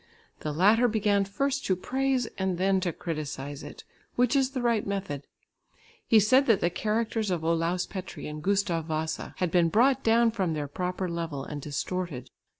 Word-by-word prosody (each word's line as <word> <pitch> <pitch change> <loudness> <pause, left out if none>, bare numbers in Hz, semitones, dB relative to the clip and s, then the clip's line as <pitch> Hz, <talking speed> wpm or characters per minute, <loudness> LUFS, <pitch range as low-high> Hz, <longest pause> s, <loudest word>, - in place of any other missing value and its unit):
The 150 - -3
latter 210 +10 +4
began 205 -3 +2
first 275 +8 -1
to 185 - +3
praise, 260 +5 0
and 190 -2 -1
then 190 +1 +2
to 180 -2 -1
criticise 145 -3 -5
it, - - -10 0.3
which 250 +2 +2
is 270 -2 +3
the 265 -2 -4
right 235 -3 +2
method. 190 -8 -4 0.8
He 225 - +6
said 255 +7 +4
that 220 -5 +4
the 175 - +1
characters 215 +3 -1
of 175 -3 -1
Olaus 165 +2 +1
Petri 185 -2 -7
and 150 0 -6
Gustav 180 -4 0
Wasa 155 0 -3
had 180 -3 0
been 170 -1 +4
brought 255 +8 +3
down 230 +1 +4
from 190 -6 -1
their 150 -2 -3
proper 180 +5 -3
level 165 -5 -4
and 145 -1 -6
distorted. 145 -2 -4
185 Hz, 175 wpm, -28 LUFS, 165-225 Hz, 0.8 s, He